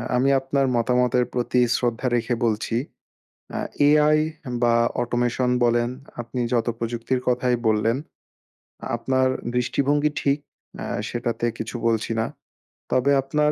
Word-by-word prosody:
আমি 130 +2 +3
আপনার 135 +1 0
মতামতের 125 +1 +2
প্রতি 125 0 +1
শ্রদ্ধা 120 +1 -1
রেখে 120 +1 0
বলছি, 110 +1 -1 0.8
আ - - -1 0.3
এআই 150 +1 +5 0.5
বা 120 -1 +4 0.3
অটোমেশন 120 +1 0
বলেন 120 0 +2 0.3
আপনি 120 +2 -6
যত 120 -1 +1
প্রযুক্তির 120 +2 -1
কথাই 125 0 +2
বললেন, 110 +3 +2 1.0
আপনার 130 +2 +1 0.3
দৃষ্টিভঙ্গি 145 +4 +1
ঠিক, 140 +1 +1 0.5
আ - - -5 0.2
সেটাতে 120 0 -2
কিছু 115 +2 -4
বলছি 115 0 +1
না। 115 - 0 0.7
তবে 130 +2 +3
আপনার 150 +2 +1
125 Hz, 120 wpm, -23 LUFS, 120-130 Hz, 1.0 s, এআই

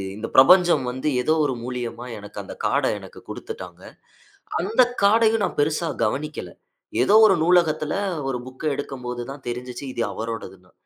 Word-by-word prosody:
இந்த 110 +2 -5
பிரபஞ்சம் 175 +4 +6
வந்து 130 +4 -4
ஏதோ 155 +5 +2
ஒரு 140 - 0
மூலியமா 120 -1 -5
எனக்கு 105 0 -12
அந்த - - -9
கார்ட - - +2
எனக்கு - - -12
குடுத்துட்டாங்க. - - -8 0.8
அந்த 215 +8 +2 0.2
கார்டயும் 220 +1 +4
நான் - - -5
பெருசா 155 +3 +1 0.2
கவனிக்கல. 135 - -3 0.5
ஏதோ 200 - +3
ஒரு 195 -3 +5
நூலகத்துல 160 -3 +2 0.4
ஒரு 130 - -1
புக் 130 +4 -9
எடுக்கம்போது 125 -3 -5
தான் 140 0 -10
தெரிஞ்சுச்சு 125 +2 -5
இது 120 - -3
அவரோடதுன்னு. 95 -5 -7
135 Hz, 145 wpm, -23 LUFS, 120-170 Hz, 0.8 s, பிரபஞ்சம்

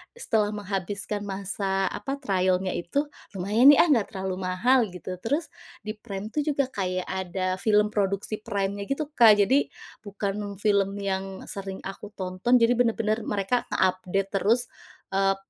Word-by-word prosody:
setelah 225 - +1
menghabiskan 205 +1 -3
masa, 195 0 -1
apa, 270 +7 -4
trial-nya 185 -5 +1
itu, 230 - -1 0.3
"Lumayan 210 +7 +3
nih 290 - +5
ah, - - +4
enggak 225 -5 +1
terlalu 190 -1 -2
mahal" 230 +6 +3
Gitu. 180 +1 -7
Terus, 290 +8 0 0.4
di 215 - -3
Prime 210 -2 -6
tuh 300 - -1
juga 280 -3 0
kayak 185 -3 -2
ada 185 0 -2
film 210 0 +3
produksi 200 +1 -1
Prime-nya 200 -2 -2
gitu, 280 +2 -1
Kak. 225 -7 +6
Jadi, 265 +8 +3 0.4
bukan 200 0 -4
film 200 -2 +2
yang 195 -1 -3
sering 195 -1 -5
aku 195 +2 -8
tonton, 185 +6 0
jadi 230 +1 +4
bener-bener 225 -2 +1
mereka 205 +5 0
nge-update 185 +1 0
terus, 225 +5 +2 0.4
eee, 195 0 +2
200 Hz, 145 wpm, -26 LUFS, 190-225 Hz, 0.4 s, Kak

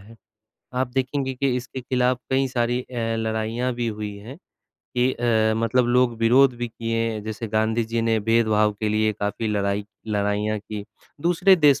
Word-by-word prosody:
है। 110 +4 -15 0.6
आप 130 0 0
देखेंगे 130 0 -1
कि 130 0 0
इसके 130 +1 -5
खिलाफ 125 0 +1
कई 135 0 +2
सारी 120 -1 0
अ, 125 - -12 0.2
लड़ाइयाँ 110 +3 -1
भी 120 -1 -1
हुई 105 -1 -4
हैं 115 +9 -10 0.6
कि 125 +1 +3
अ, 110 -2 +2
मतलब 120 +2 +2
लोग 120 -1 +2
विरोध 125 +3 +5
भी 120 0 -3
किए 115 0 -3
हैं, 105 -1 -5
जैसे 110 +1 -5
गांधी 110 +1 +1
जी 115 +1 -2
ने 115 -1 +2
भेदभाव 110 -1 +3
के 110 - 0
लिए 110 0 +2
काफ़ी 105 +2 -3
लड़ाई 100 0 0 0.2
लड़ाइयाँ 105 0 0
की। 105 0 -7 0.4
दूसरे 175 +4 +4
देश 145 -4 +5
115 Hz, 175 wpm, -23 LUFS, 110-125 Hz, 0.6 s, विरोध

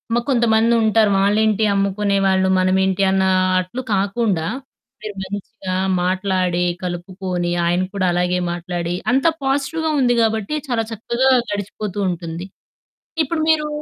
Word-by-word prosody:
మ - - +3
కొంతమందుంటారు. 225 -3 +3
వాళ్ళేంటి 215 +2 +2
అమ్ముకునే 200 0 0
వాళ్ళు 190 0 +2
మనమేంటి 190 +1 +2
అన్న 190 0 +2 0.4
అట్లు 185 +8 -4
కాకుండా 195 -3 0 0.6
మీరు 215 -1 -6
మంచిగా 195 0 -6 0.3
మాట్లాడి, 185 -1 0 0.2
కలుపుకొని, 180 0 -3
ఆయన 175 +1 +1
కూడా 195 -2 0
అలాగే 180 +1 +1
మాట్లాడి 175 0 -3 0.2
అంతా 270 +6 +3
పాజిటివ్‌గా 285 +4 0
ఉంది 245 -2 +3
గాబట్టి 220 +4 0
చాలా 235 -3 0
చక్కగా 235 +4 0 0.2
గడిచిపోతూ 205 0 -4
ఉంటుంది. 170 0 -5 0.8
ఇప్పుడు 315 +3 -2
మీరు 305 -1 +2
200 Hz, 115 wpm, -20 LUFS, 185-225 Hz, 0.8 s, మ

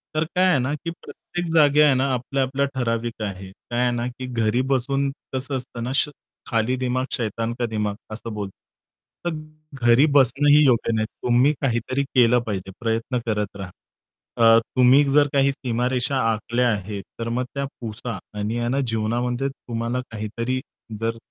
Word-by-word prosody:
तर 155 - +2
काय 185 +1 +4
आहे 180 -6 +4
ना, 130 +4 -1
की 160 +3 -4
प्रत्येक 175 0 -6
जागी 150 -2 +5
आहे 145 -3 +6
ना 130 0 +1
आपल्या 130 +2 -1
आपल्याला 140 +2 0
ठराविक 115 -1 -2
आहे. 95 -1 -6
काय 120 +5 -4
आहे 125 - +3
ना, 120 0 -2
की 130 +1 -7
घरी 120 -1 +1
बसून 135 +2 +1 0.2
कसं 130 +1 -2
असतं 125 -2 -7
ना, 125 - -2
श 150 - +2 0.4
"खाली 115 +2 +1
दिमाग 130 0 -1
शैतान 115 0 -2
का 120 - +1
दिमाग" 105 -2 -2 0.2
असं 115 +1 -6
बोलतात. 100 -2 -4 0.7
तर 175 - +1 0.5
घरी 120 +5 +6
बसणंही 145 +3 +5
योग्य 120 -3 +3
नाही. 110 0 +1 0.2
तुम्ही 125 +5 +4
काहीतरी 130 +1 0
केलं 125 -3 +4
पाहिजे, 95 -2 -3
प्रयत्न 115 +2 -1
करत 105 -3 -2
राहा. 95 -2 -7 0.7
अ, 115 0 +7 0.2
तुम्ही 130 +3 +6
जर 145 0 +5
काही 140 0 +4
सीमारेषा 125 +1 -1
आखल्या 120 +3 0
आहेत, 100 -1 -4 0.2
तर 115 0 -2
मग 125 +2 -1
त्या 140 0 -1 0.2
पुसा 115 0 -5 0.2
आणि 115 +3 -1
ना 135 +3 +1
जीवनामध्ये 120 +4 -1
तुम्हाला 120 -1 -4
काहीतरी 115 +4 -3 0.4
जर 115 0 -1
120 Hz, 165 wpm, -23 LUFS, 115-135 Hz, 0.7 s, अ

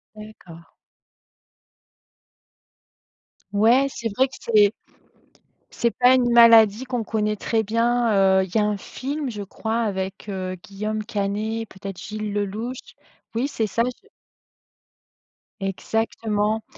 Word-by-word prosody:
D'accord. 185 -6 -13 2.8
Ouais, 235 +7 +4
c'est 235 -3 -4
vrai 265 +4 +3
que 270 - -13
c'est 215 -2 +4 1.0
c'est 235 - 0
pas 250 +2 +4
une 245 -2 +2
maladie 230 -1 +7
qu'on 245 -3 -2
connaît 210 -1 -1
très 220 +2 0
bien, 220 -4 +2
heu, - - +1
il 185 - -11
y - - +5
a 210 - +3
un 210 -1 -1
film 275 +5 -5
je 210 -3 -6
crois 220 +3 -3
avec, 195 -2 -3
heu, 185 -1 -4
Guillaume 215 +2 -4
Canet, 215 +1 -3
peut-être 195 -2 -8
Gilles 215 0 -5
Lellouche. 210 +5 -3 0.6
Oui, 255 +5 0
c'est 225 -6 -1
ça, 230 +3 0 0.2
je 425 - -25 1.5
Exactement 215 +2 -1
215 Hz, 120 wpm, -23 LUFS, 200-235 Hz, 2.8 s, maladie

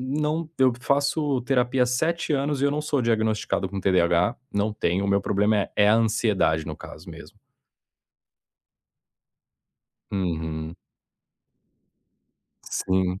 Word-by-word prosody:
não 150 +4 -2
eu 130 -1 +4
faço 140 0 +1
terapia 125 -1 +2
há - - -2
7 160 +6 -1
anos 140 0 0
e - - +1
eu 140 - +3
não 150 - -1
sou 145 -2 0
diagnosticado 110 -4 0
com 100 0 -5
TDAH. 90 +3 +2 0.2
Não 100 +1 0
tenho, 95 -2 -1
o - - -1
meu 100 0 +3
problema 105 +2 +1
é 100 - -2
é 105 0 +5
a 105 - +5
ansiedade, 110 -8 +1
no - - -5
caso - - -11
mesmo. - - -12 2.7
Uhum. 80 -4 -3 2.0
Sim. 95 0 0
110 Hz, 125 wpm, -24 LUFS, 95-135 Hz, 2.7 s, é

